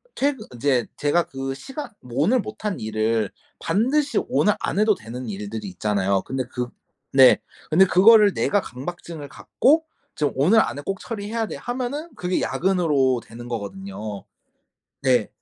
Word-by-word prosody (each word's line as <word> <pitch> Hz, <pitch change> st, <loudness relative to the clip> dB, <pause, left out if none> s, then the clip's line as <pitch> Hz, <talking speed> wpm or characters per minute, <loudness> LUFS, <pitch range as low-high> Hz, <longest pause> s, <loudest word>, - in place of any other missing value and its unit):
퇴근 270 Hz, -5 st, 0 dB
인제 125 Hz, -1 st, +1 dB
제가 150 Hz, +4 st, +2 dB
그 135 Hz, -2 st, -5 dB
시간 270 Hz, -, -7 dB
뭐 125 Hz, +3 st, -1 dB
오늘 250 Hz, +10 st, +3 dB
못한 210 Hz, -2 st, -4 dB
일을 110 Hz, -1 st, 0 dB, 0.3 s
반드시 265 Hz, -, +1 dB
오늘 210 Hz, -4 st, +2 dB
안 -, -, -1 dB
해도 215 Hz, 0 st, +4 dB
되는 120 Hz, 0 st, -7 dB
일들이 105 Hz, +1 st, -5 dB
있잖아요. 100 Hz, 0 st, 0 dB
근데 130 Hz, 0 st, -3 dB
그 125 Hz, -1 st, -3 dB, 0.5 s
네. 130 Hz, -2 st, +8 dB, 0.3 s
근데 180 Hz, +5 st, +6 dB
그거를 205 Hz, +2 st, +6 dB
내가 205 Hz, -, +2 dB
강박증을 150 Hz, +3 st, -7 dB
갖고 315 Hz, -, +2 dB, 0.3 s
"지금 145 Hz, -2 st, 0 dB
오늘 170 Hz, +12 st, +5 dB
안에 145 Hz, -, -3 dB
꼭 195 Hz, -1 st, -2 dB
처리해야 225 Hz, 0 st, -3 dB
돼." -, -, -6 dB
하면은 255 Hz, +6 st, -4 dB
그게 180 Hz, 0 st, -1 dB
야근으로 150 Hz, -9 st, +1 dB
되는 120 Hz, +2 st, -10 dB
거거든요. 115 Hz, -, -6 dB, 0.8 s
네. 125 Hz, -6 st, +3 dB
150 Hz, 305 characters per minute, -23 LUFS, -, 0.8 s, 네